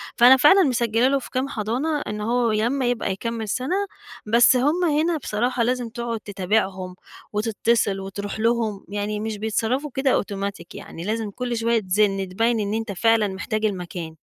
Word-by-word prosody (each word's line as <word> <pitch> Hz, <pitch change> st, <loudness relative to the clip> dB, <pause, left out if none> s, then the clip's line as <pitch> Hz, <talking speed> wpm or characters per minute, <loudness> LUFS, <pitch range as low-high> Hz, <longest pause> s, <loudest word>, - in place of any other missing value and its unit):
فأنا 250 Hz, +2 st, +7 dB
فعلًا 375 Hz, +9 st, +6 dB
مسجّلة 235 Hz, -3 st, +2 dB
له 275 Hz, +1 st, +2 dB
في 260 Hz, -, -10 dB
كام 255 Hz, +2 st, -1 dB
حضانة 255 Hz, +8 st, -1 dB
إن 210 Hz, 0 st, -5 dB
هو 235 Hz, +1 st, +1 dB
ي 215 Hz, -, +1 dB
لمّا 265 Hz, +1 st, 0 dB
يبقى 245 Hz, -4 st, 0 dB
يكمّل 225 Hz, +2 st, -4 dB
سَنة، 260 Hz, -, -1 dB, 0.5 s
بس 235 Hz, +4 st, +5 dB
همَّ 295 Hz, +8 st, +2 dB
هنا 320 Hz, +1 st, +1 dB
بصراحة 240 Hz, -1 st, -1 dB
لازم 245 Hz, 0 st, -1 dB
تقعُد 235 Hz, 0 st, -4 dB
تتابعهم 190 Hz, -2 st, -2 dB, 0.4 s
وتتصل 210 Hz, -1 st, +1 dB
وتروح 200 Hz, +2 st, -6 dB
لهم 225 Hz, -3 st, 0 dB
يعني، 205 Hz, +1 st, -3 dB
مش 215 Hz, 0 st, -4 dB
بيتصرّفوا 225 Hz, +7 st, -1 dB
كده 270 Hz, 0 st, +1 dB
أوتوماتيك 200 Hz, -3 st, -3 dB
يعني، 165 Hz, -, -8 dB
لازم 220 Hz, 0 st, -2 dB
كل 245 Hz, +1 st, -3 dB
شوية 230 Hz, 0 st, +2 dB
تزِن 195 Hz, -1 st, +1 dB
تبيّن 225 Hz, +4 st, +1 dB
إن 205 Hz, 0 st, -2 dB
أنت 225 Hz, -1 st, -2 dB
فعلًا 225 Hz, +2 st, +3 dB
محتاج 210 Hz, +3 st, -3 dB
المكان. 175 Hz, -4 st, -4 dB
225 Hz, 170 wpm, -23 LUFS, 205-245 Hz, 0.5 s, فأنا